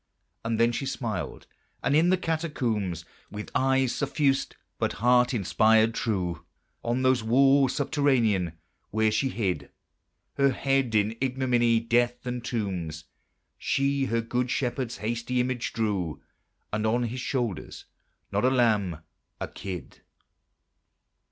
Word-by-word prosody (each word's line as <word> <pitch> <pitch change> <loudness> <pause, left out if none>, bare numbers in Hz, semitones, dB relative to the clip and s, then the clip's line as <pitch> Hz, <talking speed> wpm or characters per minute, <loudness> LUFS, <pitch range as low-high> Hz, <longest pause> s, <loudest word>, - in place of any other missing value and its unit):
And 115 -1 -1
then 115 +1 +4
she 135 +3 -3
smiled; 110 - -4 0.4
and 140 - +2
in 165 +3 +4
the 185 - +4
Catacombs, 125 - -2 0.2
With 105 +1 -7
eye 135 0 +3
suffused 135 +1 0 0.2
but - - 0
heart 125 +2 +3
inspired 110 +2 +3
true, 90 -8 -2 0.4
On 120 +2 0
those 130 -2 +3
walls 135 +3 +4
subterranean, 125 - +2 0.4
where 110 +1 +2
she 135 +5 +1
hid 90 - -2 0.7
Her 140 -1 +4
head 135 -3 +1
in 105 +1 +2
ignominy, 125 -3 +2
death, 120 +2 +1
and 125 -1 -3
tombs, 90 -10 -3 0.6
She 140 0 +1
her 115 -2 0
good 125 +2 -1
Shepherd's 125 -1 -2
hasty 115 +3 -2
image 125 -1 -1
drew 100 -8 -1 0.5
And 105 +1 0
on 120 +3 +2
his 120 +2 -3
shoulders, 120 - -3 0.5
not - - 0
a 130 - +5
lamb, 105 -10 +2 0.4
a - - -3
kid. 90 -7 -8
120 Hz, 125 wpm, -27 LUFS, 105-130 Hz, 0.7 s, a